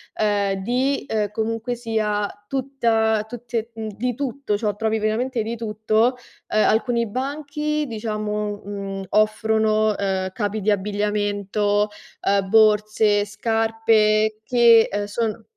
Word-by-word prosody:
ehm, 200 -2 0
di, 260 +5 0
ehm, 210 -2 -1
comunque 225 +3 -2
sia, 215 -3 -1 0.2
tutta 230 -5 0
tutte 235 -1 -5
mhmm, 220 -1 -5
di 245 +1 -1
tutto, 270 -5 -2
ciò 210 -1 -1
trovi 220 +1 0
veramente 225 +2 -1
di 230 +2 -4
tutto. 220 +2 +1 0.3
Ehm, 215 - +2
alcuni 235 +1 +1
banchi, 295 +5 -2
diciamo, 210 -2 -3
mhmm, 195 -1 -5
offrono, 215 0 +2
ehm, 190 -1 -1
capi 210 0 -2
di 210 +2 +2
abbigliamento, 205 0 0 0.3
ehm, 195 -1 +1
borse, 215 -1 +4
scarpe 220 0 +1
che, 235 -2 +5
uhm, 205 +1 -1
sono 220 +1 -3
215 Hz, 120 wpm, -22 LUFS, 210-230 Hz, 0.3 s, che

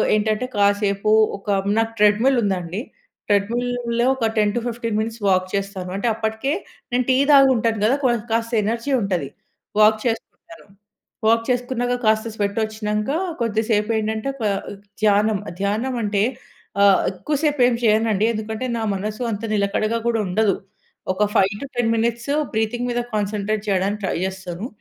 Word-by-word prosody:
ఏంటంటే 215 +3 0
కాసేపు 200 0 +2 0.3
ఒక 195 - -25 0.3
నాకు 225 0 -1
ట్రెడ్‌మిల్ 220 +6 +4
ఉందండి. 185 0 -2 0.5
ట్రెడ్‌మిల్‌లో 235 +3 0
ఒక 230 -4 0
10-15 230 +1 0
మినిట్స్ 225 0 -4
వాక్ 185 -1 +2
చేస్తాను 195 -2 -3
అంటే 200 - -1
అప్పటికే 220 +5 -1 0.4
నేను 250 0 +2
టీ 255 - +4 0.2
తాగు 275 -1 +7
ఉంటాను 225 -1 0
కదా! 240 +5 +3
క్వొన్ 240 -3 +2
కాస్త 230 +1 -1
ఎనర్జీ 235 +5 -1
ఉంటది. 180 -7 -1 0.5
వాక్ 215 0 +5
చేసుకుంటాను. 240 +6 -5 0.6
వాక్ 230 +1 +4
చేసుకున్నాక 245 0 0
కాస్త 220 0 +2
స్వెట్ 200 -1 -2
వచ్చినాక 215 0 -2 0.3
కొద్ది 225 -2 0
సేపు 210 -1 +1
ఏంటంటే 220 +3 -2
క్వ 225 - -2
ఆహ్, - - -8 0.3
ధ్యానం 210 0 +3 0.2
ధ్యానం 220 +6 -1
అంటే 205 -1 0 0.6
ఆహ్, 200 -1 +6
ఎక్కువ 195 +11 -3
సేపు 295 -3 +1
ఏమి 235 -2 0
చేయనండి 215 -1 +3
ఎందుకంటే 220 +3 -4
నా 225 - -2
మనసు 215 +4 -4
అంత 210 +2 -4
నిలకడగా 215 +2 0
కూడా 230 -1 +1
ఉండదు. 200 +2 +2 0.6
ఒక 210 +2 +1
5-10 225 +4 +1
మినిట్స్ 235 +4 -1 0.2
బ్రీతింగ్ 230 +3 -1
మీద 240 0 0
కాన్సంట్రేట్ 210 +1 -1
చేయడానికి 200 +2 0
ట్రై - - -1
చేస్తాను. 190 +2 -6
220 Hz, 145 wpm, -21 LUFS, 205-235 Hz, 0.6 s, తాగు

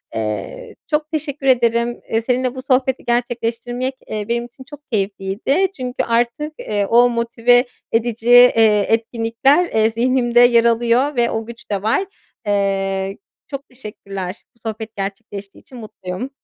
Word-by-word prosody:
Eee, 430 - -4
çok 300 +1 -1
teşekkür 290 -3 -3
ederim. 235 -1 +2
Eee, 225 - +1
seninle 250 +2 -1
bu 260 - -5
sohbeti 265 -1 +1
gerçekleştirmek, 240 +1 -1
eee, 210 -1 -4
benim 235 0 0
için 245 +2 -14
çok 290 -2 -13
keyifliydi 205 - 0
çünkü 250 -1 -3
artık, 240 +6 0
eee, 205 -1 -1
o 240 +4 +5
motive 235 +1 +2 0.3
edici, 230 0 -1
eee, 225 -4 +6
etkinlikler, 230 +7 +2
eee, 220 -9 +2
zihnimde 240 +1 +2
yer 240 -1 +6
alıyor 240 +5 +2
ve 240 -1 +2
o 225 0 -3
güç 235 +1 -12
de 200 -2 -1
var. 225 - +1 0.4
Eee, 195 -1 0 0.3
çok 275 0 -7
teşekkürler. 200 -6 -7
Bu - - -32
sohbet 220 0 -6
gerçekleştiği 200 0 -6
için 255 - -13
mutluyum. 210 0 -7
235 Hz, 140 wpm, -19 LUFS, 215-255 Hz, 0.4 s, eee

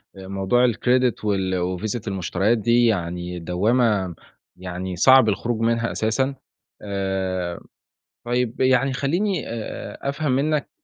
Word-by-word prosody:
موضوع 95 +6 +1
الcredit 125 +1 +1
وال 95 -3 0
وڤيزة 110 +3 -3
المشتريات 95 +3 0
دي 120 +3 +3
يعني 90 -4 -1
دوامة 95 +1 +1 0.4
يعني 90 0 -5
صعب 130 +5 +6
الخروج 115 +3 -1
منها 115 0 +1
أساسًا. 130 +5 0 0.5
آآ 95 -3 -2 0.7
طيب 120 -1 -1
يعني 130 +1 +3
خلّيني 175 +9 0
آآ 115 -1 -6
أفهم 140 0 -1
منّك 145 +3 0
110 Hz, 110 wpm, -23 LUFS, 95-125 Hz, 0.7 s, صعب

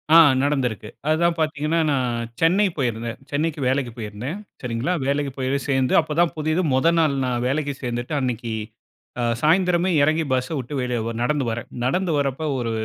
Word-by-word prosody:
ஆ - - +11 0.3
நடந்திருக்கு. 125 -7 -1 0.2
அதுதான் 165 +2 +2
பார்த்தீங்கன்னா, 155 +1 0
நான் 120 -4 -1
சென்னை 180 +6 +4
போயிருந்தேன். 115 -3 -2
சென்னைக்கு 150 +2 -1
வேலைக்கு 130 -1 0
போயிருந்தேன். 115 - -5 0.3
சரிங்களா. 125 +7 -1
வேலைக்கு 140 0 0
போய் - - -8
போய் - - +2
சேர்ந்து 130 -2 +2
அப்போதான் 160 +2 +1
புதது. 155 +3 +1
முத 130 +5 +3
நாள் 155 -4 +3
நான் 120 -1 -1
வேலைக்கு 145 +2 -1
சேர்ந்துட்டு, 120 +3 -3
அன்னைக்கு 120 -2 -2 0.7
அ - - 0 0.2
சாயந்திரமே 175 +2 +3
இறங்கி, 155 +3 +3
பஸ்ஸ 125 0 0
விட்டு 130 +2 -5
வெளிய 125 -1 -1
ஒர் 115 0 -4
நடந்து 145 +1 +1
வரேன். 115 +1 -5 0.2
நடந்து 180 +7 +1
வரப்போ 140 +2 -1
ஒரு 115 -2 -2
140 Hz, 165 wpm, -23 LUFS, 120-155 Hz, 0.7 s, ஆ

